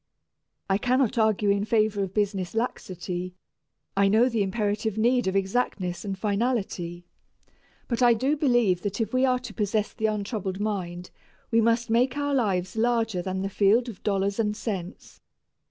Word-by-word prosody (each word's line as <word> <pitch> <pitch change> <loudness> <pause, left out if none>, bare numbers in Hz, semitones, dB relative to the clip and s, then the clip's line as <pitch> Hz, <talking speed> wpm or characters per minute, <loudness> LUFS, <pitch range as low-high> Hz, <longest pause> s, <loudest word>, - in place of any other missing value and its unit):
I 195 0 +1
cannot 255 0 +1
argue 215 -2 +3
in 200 0 +1
favor 215 -2 +1
of 190 -2 -2
business 200 -2 -1
laxity, 185 -5 -3 0.6
I 200 0 +4
know 225 +5 +4
the 230 -3 0
imperative 210 +1 -1
need 245 +1 +2
of 190 - 0
exactness 190 -3 -1
and 195 -2 -4
finality, 200 -5 -2 0.8
but 235 0 -2
I 240 -1 +6
do 265 +6 +1
believe 240 - +2
that 205 +1 -3
if 225 0 -2
we 255 +1 +3
are 255 -1 +3
to 245 -3 -8
possess 210 0 -1
the 220 -1 0
untroubled 205 -2 -3
mind 180 -4 -3 0.4
we 230 0 +4
must 230 +1 +1
make 250 +4 +2
our 285 0 0
lives 195 -8 0
larger 225 -4 +1
than 190 +1 -3
the - - -1
field 210 +5 +3
of 210 - -10
dollars 200 0 0
and 210 -1 0
cents. 190 -4 -6
210 Hz, 165 wpm, -26 LUFS, 195-235 Hz, 0.8 s, I